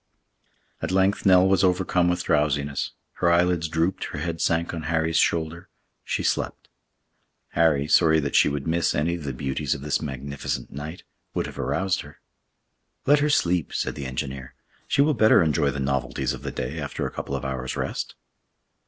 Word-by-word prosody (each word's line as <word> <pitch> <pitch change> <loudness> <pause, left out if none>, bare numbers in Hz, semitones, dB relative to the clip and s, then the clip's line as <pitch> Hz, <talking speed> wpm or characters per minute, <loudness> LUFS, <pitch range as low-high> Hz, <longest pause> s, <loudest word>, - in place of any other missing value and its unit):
At - - -2
length 95 +2 +2
Nell 95 0 +6
was 95 -1 +3
overcome 90 -1 +2
with 90 - 0
drowsiness, 70 -1 0 0.2
her 85 -1 +3
eyelids 85 -1 +2
drooped, 80 +4 0
her - - -6
head 85 -1 -3
sank 85 +1 +1
on 80 - -4
Harry's 80 0 +1
shoulder—she 85 +1 -2
slept. - - -2 0.8
Harry, 75 -4 +2
sorry 80 0 +5
that 70 -2 -2
she - - +6
should 70 -1 -3
miss 85 0 +1
any 80 +3 +1
of 85 -4 -5
the 70 - -2
beauties 65 +1 -2
of - - -8
this 75 0 -1
magnificent 70 -1 -4
night, 75 +5 -7 0.3
would - - 0
have - - -9
aroused 95 -1 0
her. - - -14 0.9
"Let 145 +1 +5
her 150 +1 +2
sleep!" 90 - +1
said - - -1
the 70 -2 -5
engineer. 65 0 -5 0.3
"She 140 - +3
will 155 +1 +2
better 110 -7 +5
enjoy 75 -2 +2
the 70 - -4
novelties 65 -1 -1
of - - -8
the - - -4
day 60 -1 -4
after - - -3
a - - -3
couple 70 - -4
of 70 - -4
hours' 65 -1 -3
rest." - - -3
80 Hz, 180 wpm, -25 LUFS, 70-90 Hz, 0.9 s, Nell